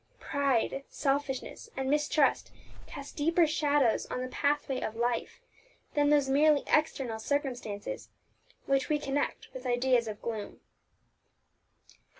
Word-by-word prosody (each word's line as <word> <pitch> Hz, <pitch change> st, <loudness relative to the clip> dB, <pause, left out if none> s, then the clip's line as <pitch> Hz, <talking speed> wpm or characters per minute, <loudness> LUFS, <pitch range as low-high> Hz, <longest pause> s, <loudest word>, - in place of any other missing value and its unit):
Pride, 275 Hz, -1 st, 0 dB
selfishness, 280 Hz, -, -2 dB
and 265 Hz, 0 st, -1 dB
mistrust 295 Hz, 0 st, +2 dB, 0.4 s
cast 280 Hz, 0 st, -9 dB
deeper 330 Hz, +3 st, +3 dB
shadows 290 Hz, -6 st, +2 dB
on 250 Hz, -, -3 dB
the 255 Hz, -, -3 dB
pathway 285 Hz, -1 st, 0 dB
of 220 Hz, -, -3 dB
life 235 Hz, +1 st, -1 dB, 0.5 s
than 290 Hz, -1 st, +3 dB
those 290 Hz, -2 st, +4 dB
merely 290 Hz, +2 st, +4 dB
external 270 Hz, -7 st, +1 dB
circumstances 255 Hz, -, -3 dB, 0.6 s
which 275 Hz, -1 st, +1 dB
we 300 Hz, -, +3 dB
connect 285 Hz, 0 st, -2 dB
with 260 Hz, 0 st, -6 dB
ideas 245 Hz, -1 st, +2 dB
of 210 Hz, -1 st, -5 dB
gloom. 220 Hz, -3 st, -5 dB
275 Hz, 120 wpm, -30 LUFS, 250-290 Hz, 0.6 s, those